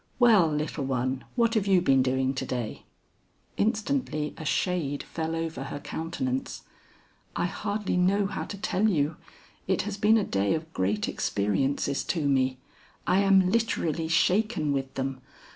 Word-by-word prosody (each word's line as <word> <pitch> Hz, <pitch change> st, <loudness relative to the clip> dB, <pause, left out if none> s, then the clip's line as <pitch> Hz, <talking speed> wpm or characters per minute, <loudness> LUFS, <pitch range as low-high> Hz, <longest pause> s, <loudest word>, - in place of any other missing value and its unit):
"Well, 225 Hz, -9 st, +6 dB
little 150 Hz, -1 st, -2 dB
one, 130 Hz, 0 st, -1 dB
what 230 Hz, -2 st, +2 dB
have 210 Hz, -4 st, +1 dB
you 190 Hz, -2 st, +5 dB
been 135 Hz, -6 st, +4 dB
doing 130 Hz, +1 st, +1 dB
to 130 Hz, -, -3 dB
day?" 120 Hz, -4 st, -4 dB, 0.7 s
Instantly 215 Hz, -, -1 dB
a -, -, -8 dB
shade 155 Hz, -3 st, -1 dB
fell 160 Hz, 0 st, -3 dB
over 160 Hz, -5 st, -3 dB
her 145 Hz, -, -5 dB
countenance. 135 Hz, -6 st, -4 dB, 0.7 s
"I -, -, 0 dB
hardly 205 Hz, +1 st, -2 dB
know 195 Hz, +3 st, +3 dB
how 195 Hz, -, -3 dB
to 200 Hz, -, -7 dB
tell 200 Hz, +2 st, +1 dB
you. 155 Hz, -4 st, 0 dB, 0.5 s
It 190 Hz, -1 st, +1 dB
has 205 Hz, 0 st, -4 dB
been 215 Hz, +2 st, +4 dB
a 215 Hz, -, +2 dB
day 100 Hz, -, +1 dB
of 160 Hz, 0 st, -6 dB
great 100 Hz, +3 st, 0 dB
experiences 135 Hz, +7 st, 0 dB
to 160 Hz, -5 st, 0 dB
me. 130 Hz, -2 st, +2 dB, 0.5 s
I 185 Hz, +2 st, +3 dB
am 195 Hz, -2 st, +4 dB
literally 170 Hz, -8 st, 0 dB
shaken 180 Hz, -2 st, +2 dB
with 135 Hz, -1 st, -2 dB
them. 135 Hz, -1 st, -3 dB
160 Hz, 155 wpm, -27 LUFS, 135-195 Hz, 0.7 s, Well